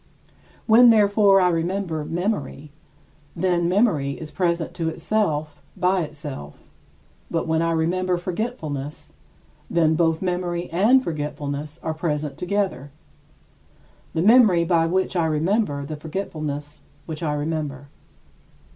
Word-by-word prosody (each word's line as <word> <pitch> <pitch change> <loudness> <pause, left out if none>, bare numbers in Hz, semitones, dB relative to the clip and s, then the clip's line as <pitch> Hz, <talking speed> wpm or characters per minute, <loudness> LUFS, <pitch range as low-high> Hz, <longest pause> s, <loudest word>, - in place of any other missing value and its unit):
When, 235 +2 +7
therefore, 205 -2 +5
I 180 -1 +4
remember 170 -1 -1
memory, 165 -4 -3 0.6
then 175 -2 +1
memory 180 - +2
is 155 -1 -7
present 170 -2 -1
to 165 -1 -2
itself 155 -6 -1 0.2
by 185 +1 +2
itself, 145 - -7 0.7
but 165 - -1
when 160 0 +1
I 165 0 +1
remember 180 +3 0
forgetfulness 170 - -5 0.6
then 160 -2 +3
both 165 0 +2
memory 175 -1 -2
and 225 +10 +4
forgetfulness 150 - -4
are 160 - -2
present 150 -3 -2
together 180 -7 -2 1.3
the 160 - +1
memory 215 -6 +6
by 165 -1 +2
which 190 +2 0
I 170 -2 +2
remember 155 -1 0
the 155 +1 -6
forgetfulness 150 -3 -5 0.2
which 160 -1 -6
I 150 -3 -1
remember. 145 -2 -4
165 Hz, 120 wpm, -23 LUFS, 150-185 Hz, 1.3 s, When